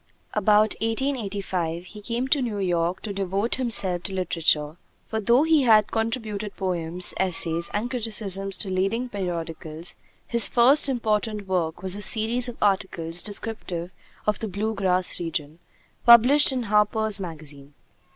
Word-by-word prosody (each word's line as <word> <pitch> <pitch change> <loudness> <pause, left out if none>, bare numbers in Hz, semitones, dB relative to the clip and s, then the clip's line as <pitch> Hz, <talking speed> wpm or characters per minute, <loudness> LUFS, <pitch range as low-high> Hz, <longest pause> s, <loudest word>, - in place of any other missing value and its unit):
About 210 +1 +3
1885 200 -8 -2
he 210 +3 -12
came 235 +4 -3
to 285 -1 +2
New 230 -5 -3
York 175 -2 -1
to 210 - -5
devote 195 +3 -2
himself 200 -8 +2
to 195 - -6
literature; 160 -4 0 0.3
for 220 - -3
though 235 +6 +3
he 320 -2 +3
had 220 -4 +4
contributed 220 -2 -3
poems, 180 -2 0
essays, 170 -2 +1
and 210 +3 -2
criticisms 210 -5 -1
to 195 - -3
leading 195 +7 -1
periodicals, 165 -4 -5 0.3
his 235 -2 +4
first 270 +5 +5
important 215 -4 -2
work 175 -3 -2
was 190 0 +1
a 205 - -5
series 225 +4 +2
of 240 - -9
articles 180 -4 0
descriptive 200 -5 -4 0.3
of 210 -2 0
the 220 - -4
"Blue 210 +3 -3
Grass 185 -3 0
Region," 160 -2 -4 0.4
published 250 +6 +7
in 255 -2 -2
Harper's 210 0 +1
Magazine. 150 -5 -8
200 Hz, 140 wpm, -24 LUFS, 180-225 Hz, 0.4 s, published